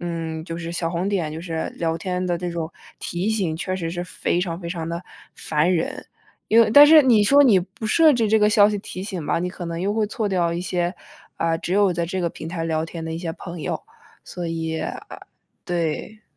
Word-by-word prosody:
嗯， 165 -2 -4
就 165 -1 -6
是 170 0 -5
小 165 -1 -2
红 180 +2 -1
点， 175 -7 -1
就 160 - -6
是 165 -2 -4
聊 165 -1 -1
天 180 +2 -3
的 175 -1 0
这 175 +1 -4
种 165 -1 -4 0.3
提 175 +4 -3
醒， 185 -8 -1
确 185 +2 -3
实 165 -3 -3
是 175 0 -3
非 175 0 -1
常 170 -2 -3
非 170 - -6
常 165 -2 -4
地 170 +1 -4 0.3
烦 155 +4 +1
人。 165 -2 -2 0.4
因 225 +2 +6
为 220 -2 +4
但 290 +6 +10
是 310 +1 +9
你 230 -6 +5
说 280 +6 +6
你 230 -9 +6
不 190 +4 -6
设 315 +7 +5
置 230 -4 +1
这 220 +1 +4
个 210 0 +4
消 210 -1 +6
息 210 - -1
提 190 -2 -7
醒 190 -5 -5
吧， - - 0
你 180 +2 -2
可 180 -1 -7
能 170 0 -4
又 200 +3 0
会 215 -1 +1
错 215 0 -2
掉 175 -3 +1
一 170 - -3
些， 180 0 -1 0.4
呃， 165 0 +1
只 175 - -4
有 200 -2 +3
在 170 0 -1
这 185 +3 -3
个 170 - 0
平 160 - -9
台 165 0 -4
聊 160 -1 0
天 165 0 -7
的 160 - -5
一 - - -4
些 165 -1 -4
朋 170 -1 -8
友， - - -3 0.4
所 175 -1 -6
以 160 -1 -3
啊， - - -4 0.7
对。 175 +5 -3
175 Hz, 255 characters per minute, -23 LUFS, 165-200 Hz, 0.7 s, 但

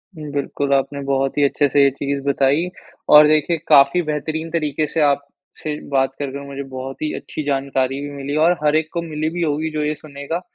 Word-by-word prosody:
बिल्कुल, 145 -2 -2
आपने 140 +1 0
बहुत 135 0 0
ही 145 - +3
अच्छे 145 +1 +2
से 140 +1 +4
ये 140 - +6
चीज़ 140 +1 -3
बताई 140 +5 +2 0.5
और 150 0 +9
देखिए 155 +2 +2
काफ़ी 140 +3 +6
बेहतरीन 160 +1 -3
तरीके 155 -2 -1
से 160 - -1
आपसे 145 +1 -2
बात 135 -1 +1
करके 140 0 -5
मुझे 140 0 -6
बहुत 130 +1 -6
ही 155 - -1
अच्छी 155 - -6
जानकारी 135 -1 -1
भी 145 - -5
मिली 140 +1 -4
और 175 -1 +3
हर 150 0 +3
एक 155 0 +1
को 170 - -1
मिली 155 -1 -3
भी 175 +2 -4
होगी 155 0 0
जो 155 -1 -2
ये 150 0 -1
सुनेगा। 145 +3 -6
145 Hz, 200 wpm, -20 LUFS, 140-155 Hz, 0.5 s, और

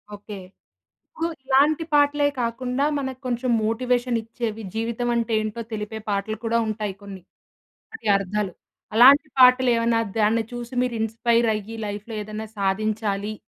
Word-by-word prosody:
Okay. 205 0 -9 0.7
ఇప్పుడు 335 -8 -3 0.2
ఇలాంటి 285 +4 +3
పాటలే 290 0 +4
కాకుండా 250 +3 -1
మనకు 265 -1 -5
కొంచెం 245 +1 -1
మోటివేషన్ 245 +2 0
ఇచ్చేవి, 225 -1 -5
జీవితం 230 +2 -2
అంటే 230 -1 -1
ఏంటో 215 +2 -4
తెలిపే 215 0 -4
పాటలు 205 +2 -1
కూడా 230 +1 +1
ఉంటాయి 210 -2 -3
కొన్ని. 195 -2 -9 0.7
వాటి 445 - -8
అర్థాలు, 195 0 -2 0.4
అలాంటి 280 +5 +7
పాటలు 255 0 +7
ఏమన్నా 230 0 +2 0.2
దాన్ని 220 +2 +3
చూసి 240 +1 -7
మీరు 245 -2 -2
ఇన్‌స్పైర్ 230 +1 +1
అయ్యి, 215 +2 -6
లైఫ్‌లో 210 +2 -6
ఏదైనా 215 +1 -6
సాధించాలి 205 +1 -1
230 Hz, 135 wpm, -23 LUFS, 215-250 Hz, 0.7 s, అలాంటి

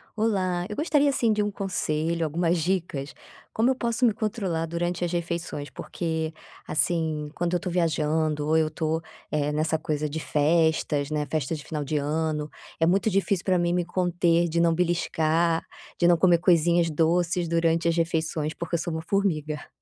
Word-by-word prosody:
Olá, 185 -5 0
eu 210 - -6
gostaria, 295 -2 +2
assim, 240 -5 +2
de 210 -1 +1
um 205 - -1
conselho, 165 -4 -1
algumas 170 +3 +1
dicas, 165 -6 -2 0.4
como 230 +4 +2
eu 265 - +2
posso 235 -1 -2
me 235 -3 +5
controlar 200 -6 -2
durante 175 +1 -2
as 170 - -3
refeições, 170 -4 -3
porque 160 +3 -3 0.3
assim, 155 -1 0
quando 175 0 -1
eu - - +1
tô 180 - -4
viajando 155 -3 0
ou 160 +1 +3
eu 160 -1 +2
tô, 160 +1 -1 0.3
eh, 150 -1 0
nessa 155 +2 0
coisa 150 -1 -2
de 155 +2 -4
festas, 155 -1 +1
né, 150 -1 -1
festas 155 0 -1
de - - -10
final 150 -2 -3
de 150 +2 -1
ano, 150 +1 -1 0.3
é 165 - +4
muito 195 +5 +2
difícil 195 -1 +1
pra 185 -2 +2
mim 175 0 +1
me 175 -1 0
conter, 175 -1 +1
de 170 +1 0
não 170 0 +4
beliscar, 165 -1 +1 0.4
de 175 - +4
não 175 -1 +5
comer 175 0 +4
coisinhas 170 -1 +3
doces 170 +2 +1
durante 165 0 +1
as 165 - +2
refeições, 160 -2 -1
porque 170 0 -7
eu - - 0
sou 170 0 -3
uma 160 0 -4
formiga. 155 -6 -1
165 Hz, 180 wpm, -26 LUFS, 155-180 Hz, 0.4 s, me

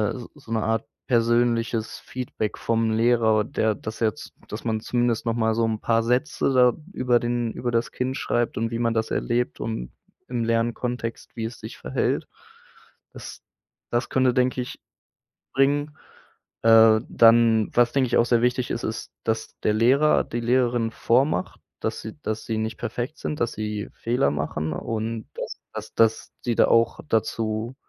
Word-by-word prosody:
s 120 -2 -8
so 135 -6 -14
'ne 110 -1 0
Art 115 0 0 0.2
persönliches 115 -1 +1
Feedback 120 -4 -4
vom 115 -1 0
Lehrer, 110 -1 +3
der 110 -1 0
das 110 +3 -7
jetzt 110 -2 -2 0.2
dass 105 - -7
man 110 -1 0
zumindest 120 -1 0
noch 115 - +1
mal 110 -1 +1
so 115 - +1
'n 110 -1 -1
paar 115 0 +2
Sätze 125 +3 +1
da 125 -1 +5 0.2
über 125 -9 +2
den 120 -1 -1
über 120 0 -3
das 115 0 0
Kind 130 +1 -2
schreibt 120 -1 -1
und 115 +1 0
wie 115 - -2
man 115 -1 +1
das 110 0 -1
erlebt 120 +1 -1
und 110 - -4 0.4
im 120 -2 -1
Lernkontext, 115 0 -2
wie 115 - -2
es 115 +1 -6
sich - - -8
verhält. - - -1 0.9
Das - - -9 0.5
das 120 +1 0
könnte, 130 -1 +3
denke 125 0 +1
ich, 125 - -7 0.8
bringen. 145 +2 +2 0.7
Äh, 110 -1 +7
dann, 115 -1 +5
was 120 0 +4
denke 135 -2 +2
ich 115 - 0
auch 115 - +4
sehr 120 -1 +3
wichtig 125 +1 0
ist, 120 - -3
ist, 110 0 -4
dass 110 0 -2
der 105 - +3
Lehrer, 130 +8 +4
die 120 - -4
Lehrerin 120 -1 +1
vormacht, 120 -4 +1 0.2
dass - - -2
sie 110 +6 -8
dass 110 -3 -3
sie 110 - -2
nicht 110 0 -3
perfekt 125 +7 -4
sind, 150 - -4
dass 120 - +1
sie 105 0 -4
Fehler 115 - 0
machen 75 +1 -2
und 115 +4 -4
dass - - -5 0.2
dass - - -7
dass 110 -1 +2
die 120 -2 +1
da - - +5
auch 115 0 +3
dazu 110 +2 -1
115 Hz, 170 wpm, -24 LUFS, 110-120 Hz, 0.9 s, Äh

